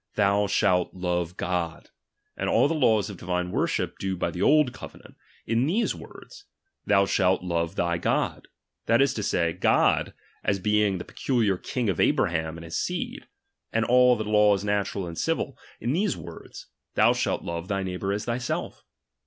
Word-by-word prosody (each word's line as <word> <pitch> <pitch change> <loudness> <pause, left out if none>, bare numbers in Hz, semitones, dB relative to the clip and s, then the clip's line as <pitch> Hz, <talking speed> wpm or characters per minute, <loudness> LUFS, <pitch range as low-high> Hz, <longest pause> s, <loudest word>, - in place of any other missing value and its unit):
Thou 100 0 +2
shalt 95 -3 +1
love 90 -1 -2
God; 85 -2 -3 0.4
and - - -2
all - - +4
the 160 - 0
laws 110 - +2
of 100 - -10
divine 90 +1 -2
worship - - -1
due 95 -1 -2
by - - -1
the 90 - -5
old 150 -4 +4
covenajit, - - -12 0.3
in 115 +4 +1
these 215 +8 +1
words. 405 - -13 0.4
Thou 100 -1 +4
shalt 95 -1 +2
lorn 85 -2 -1
thy 85 0 0
God, - - -1 0.4
that 115 +1 +4
is 140 -1 +3
to 110 - -3
say, 85 -4 0
God, - - +2 0.3
as 100 - +1
being 105 0 +1
the 90 - -7
pe - - -17
culiar 110 -8 0
King 125 -3 -2
of' 95 -5 -1
Abraham 80 -1 +1
and 85 - -9
his 80 - -3
seed: - - -4 0.4
and 115 0 +1
all 125 0 +5
the 110 - -3
laws 105 -2 +3
natural 100 -2 -1
and 85 -1 -6
civil, - - -1 0.2
in 120 +4 -1
these 195 +4 0
words, 85 -1 -10 0.3
Thou - - +5
shalt - - -1
love 85 +1 -5
thy 95 -1 -1
jieighbour 95 +1 -3
as 105 +1 -2
thyself. 120 +1 -3
100 Hz, 180 wpm, -26 LUFS, 90-115 Hz, 0.4 s, all